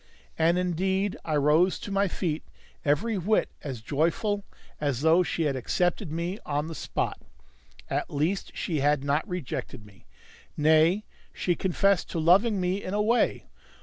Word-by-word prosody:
And 165 +2 +3
indeed 190 +2 0
I 155 - -1
rose 150 +6 +3
to 205 - -7
my 200 0 +2
feet 165 -3 -2 0.4
every 195 +9 +1
whit 210 +5 +1
as 130 -6 -6
joyful 170 - 0 0.4
as 140 -4 -1
though 160 +3 +5
she 175 -2 -1
had 145 -3 0
accepted 175 - -1
me 170 +5 -3
on 145 0 -1
the 165 - -6
spot. - - -3 0.7
At - - -2
least 160 +7 -1
she 160 -4 -1
had 145 0 +2
not 145 +6 0
rejected 130 - -5
me; 100 -10 -19 0.5
nay, 160 +6 +4 0.3
she 180 - 0
confessed 190 +1 +1
to 165 - -3
loving 195 +6 +4
me 185 +2 0
in 185 - -3
a 210 - +2
way. 235 +3 +1
170 Hz, 155 wpm, -27 LUFS, 150-190 Hz, 0.7 s, though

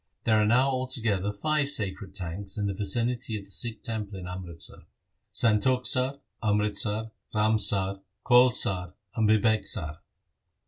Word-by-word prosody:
There 110 -1 +3
are 105 - +2
now 125 +4 +4
altogether 115 -7 -1
five 150 +6 0
sacred 100 -6 -4
tanks 95 +3 -6
in 105 - -1
the 100 - -1
vicinity 115 +3 -2
of 100 - -9
the 100 - -12
Sikh 110 -1 -2
temple 105 -3 -4
in 90 - -7
Amritsar: 90 -2 -6 0.4
Santokhsar, 125 +4 +2 0.2
Amritsar, 105 +1 0 0.2
Ramsar, 105 -3 +2 0.2
Kaul 125 0 +7
sar, 90 -5 +1 0.2
and 110 -2 +2
Bibeksar. 110 -8 +1
105 Hz, 130 wpm, -27 LUFS, 100-120 Hz, 0.4 s, Kaul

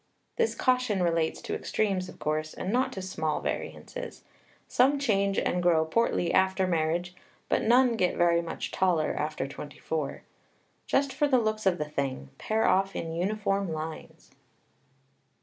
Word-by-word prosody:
This 465 -1 +1
caution 250 -7 +1
relates 165 -2 0
to - - -4
extremes, 190 -4 -1
of - - -12
course, 155 +1 -2
and 190 - -3
not 255 +2 +2
to 190 - -5
small 160 -5 -2
variances. - - -5 0.4
Some 270 +3 +3
change 200 -7 +1
and 180 - +1
grow 165 -2 +3
portly 175 0 +1
after 190 0 +3
marriage, 170 +1 0 0.4
but - - +2
none 245 +1 +4
get 180 -4 +1
very 170 -1 +4
much 165 -1 -5
taller 175 -5 +1
after 150 -2 -2
twenty 145 +1 -9
four. 155 -3 -3 0.6
Just 275 0 +1
for 295 -1 +2
the 265 -3 +4
looks 215 -3 0
of 180 -2 +3
the 150 - -2
thing, 135 - -3
pair 220 +1 +1
off 195 +1 +2
in 165 -1 -3
uniform 195 +1 -1
lines. 155 0 -7
185 Hz, 155 wpm, -28 LUFS, 160-215 Hz, 0.6 s, none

